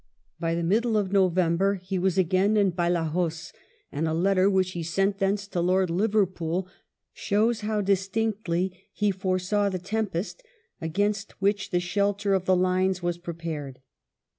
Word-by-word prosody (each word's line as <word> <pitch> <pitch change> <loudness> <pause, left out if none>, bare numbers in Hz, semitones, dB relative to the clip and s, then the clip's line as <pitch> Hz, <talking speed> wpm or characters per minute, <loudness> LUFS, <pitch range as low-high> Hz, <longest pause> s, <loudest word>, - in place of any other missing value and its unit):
By 165 0 0
the 170 - -1
middle 220 +6 +2
of 195 -3 -1
November 185 0 +2
he 185 0 -4
was 190 0 +1
again 190 +4 +3
in 200 -2 +3
Badajoz, 170 -1 -1 0.4
and 155 +3 -1
a 160 - 0
letter 190 +2 +3
which 190 -2 +1
he 175 - -4
sent 195 +4 0
thence 200 +1 0
to 180 -3 -1
Lord 185 0 +2
Liverpool 185 -3 0 0.5
shows 220 +3 +1
how 215 0 -1
distinctly 195 -2 0 0.2
he 210 -1 +1
foresaw 190 +2 0
the 185 - -2
tempest 205 - -3 0.4
against 200 +5 -1
which 200 +1 0
the 175 - +1
shelter 200 +2 0
of 190 -1 +1
the 185 - +4
Lines 185 0 +1
was 175 0 -1
prepared. 165 -6 -6
185 Hz, 150 wpm, -26 LUFS, 175-200 Hz, 0.5 s, the